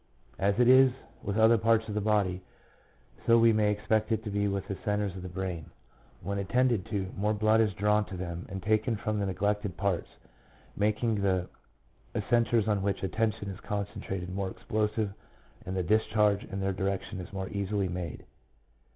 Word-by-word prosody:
As 100 +2 +1
it 125 - +5
is 130 +1 +7 0.3
with 100 +1 -3
other 110 +1 +6
parts 115 0 +3
of 105 - -4
the 105 - -1
body, 100 -3 +1 0.9
so 115 - +7
we 115 0 +6
may 105 -1 +3
expect 110 +1 0
it 110 0 0
to 105 - -4
be 100 0 +1
with 100 -1 -2
the 100 - -3
centres 105 -3 -1
of 95 - -6
the 90 - -6
brain; 90 -3 -4 0.5
when 100 0 -2
attended 120 0 +1
to, 100 -2 -2
more 105 +2 0
blood 110 +1 +4
is 110 -2 +2
drawn 105 +1 +2
to 95 0 -7
them 85 -1 -5
and 95 -1 -6
taken 110 +3 +2
from 105 0 -2
the 100 - 0
neglected 100 -1 -1
parts, 95 -2 0 0.7
making 105 +1 +1
the 95 -2 +1 0.8
contres 115 -2 +3
on 105 -2 +1
which 100 0 -1
attention 110 0 -1
is 95 - -9
concentrated 95 -3 -4
more 95 0 -2
explosive, 105 +1 -1 0.5
and 95 +1 -2
the 90 - +1
discharge 105 +1 +2
in 95 - -5
their 95 0 0
direction 95 0 -2
is 90 - -8
more 95 -1 -4
easily 100 -1 -1
made. 90 -3 -5
105 Hz, 180 wpm, -29 LUFS, 95-110 Hz, 0.9 s, is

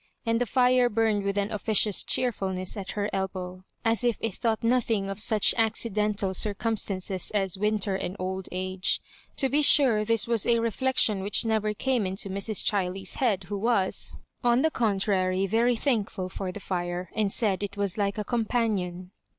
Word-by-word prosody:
And 230 +1 +1
the 245 - 0
fire 250 0 +3
burned 220 -2 +1
with 200 0 -2
an 200 +1 -1
officious 210 -1 +2
cheerfulness 190 -7 0
at 195 -2 -6
her 205 -1 -1
elbow, 185 -1 -4 0.2
as 225 +1 +3
if 240 -3 +1
it 225 -3 -3
thought 225 +2 -1
nothing 230 -4 +1
of 195 - -6
such 215 -1 +4
accidental 210 -3 0
circumstan 205 -1 0
ces 185 0 -1
as 195 -3 0
winter 210 0 0
and 185 -1 -4
old 190 0 -4
age. 185 0 -1 0.4
To 270 - +3
be 285 +3 +2
sure 260 -7 +5
this 225 0 0
was 230 -3 +2
a 235 -1 +4
reflection 230 -2 +1
which 200 +4 +1
never 215 -1 0
came 250 -4 0
into 190 +1 -3
Mrs. 200 +1 0
Chiley's 190 -1 -1
head, 210 -7 +1
who 200 +3 -5
was, 205 -3 0 0.3
on 240 +1 +3
the 320 - +2
contrary, 195 -5 0
very 230 +5 +2
thankful 215 -7 -1
for 190 0 -5
the 205 - -8
fire, 175 -2 -4
and 210 -3 +1
said 200 -4 +2
it 205 0 -5
was 200 -3 0
like 200 -1 -1
a 210 - -2
companion. 205 -6 -2
205 Hz, 175 wpm, -26 LUFS, 190-230 Hz, 0.4 s, sure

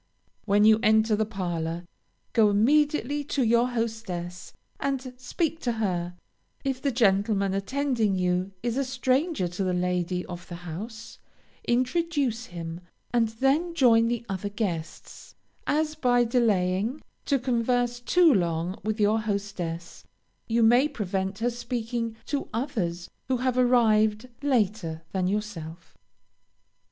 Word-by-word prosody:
When 205 0 +4
you 220 0 +6
enter 220 0 +4
the 215 0 0
parlor, 175 -4 -3 0.5
go 220 -2 +5
immediately 290 +6 +2
to 275 -1 0
your 235 +1 +3
hostess, 215 -7 -4 0.3
and 265 -2 -2
speak 320 +6 -2
to 245 -6 -1
her; 180 -5 -2 0.5
if 265 -2 -2
the 280 - +1
gentleman 200 -3 +2
attending 230 0 0
you 180 +1 0
is 240 +1 -1
a 275 - +2
stranger 265 - 0
to 180 +3 -3
the 185 -1 0
lady 180 0 -1
of 175 -1 -8
the 175 - -7
house, 220 +7 -7 0.5
introduce 255 -1 0
him, 170 0 -7 0.3
and 235 -2 +3
then 270 +10 0
join 230 -6 +5
the 235 0 -2
other 195 0 -3
guests, 185 -6 -5 0.3
as 305 +1 +1
by 245 -5 +3
delaying, 220 0 +1 0.2
to 280 - +2
converse 245 -1 0
too 330 +6 +4
long 170 +1 -1
with 215 +1 -2
your 210 +1 +3
hostess, 195 -5 -4 0.4
you 230 0 +2
may 245 +5 +5
prevent 195 -7 -3
her 240 +2 0
speaking 235 -1 -3
to 285 -2 -3
others 210 - -2 0.2
who 260 -1 +1
have 255 0 0
arrived 225 -3 +3
later 210 - 0
than 185 -2 0
yourself. 185 -5 -5
225 Hz, 130 wpm, -26 LUFS, 190-250 Hz, 0.5 s, you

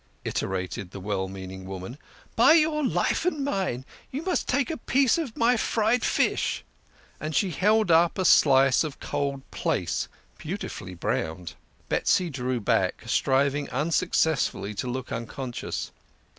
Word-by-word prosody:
iterated 95 0 -3
the 100 - -8
well 95 -1 -2
meaning 95 0 -8
woman. 95 +5 -7 0.4
"By 240 +7 +7
your 310 -2 +3
life 265 - +1
and 305 -6 0
mine, 185 - -2 0.2
you 280 +5 -4
must 370 0 -1
taste 280 +4 +1
a 320 - -3
piece 265 +4 +2
of 270 -9 -5
my 235 +2 +4
fried 225 +2 +1
fish." - - +1 0.6
And 155 0 -4
she 195 -3 +2
held 210 +3 +3
up 165 +3 +4
a 185 - 0
slice 135 -4 +5
of 150 -3 -6
cold 140 -1 -2
plaice, - - -1 0.3
beautifully 90 0 -6
browned. 85 0 -3 0.3
Betsy 180 -3 +1
drew 130 -2 -2
back, 105 - 0
striving 140 +2 +1
unsuccessfully 155 - 0
to 105 - -4
look 130 +1 -4
uncon 120 +2 -5
scious. - - -4
140 Hz, 145 wpm, -26 LUFS, -, 0.6 s, By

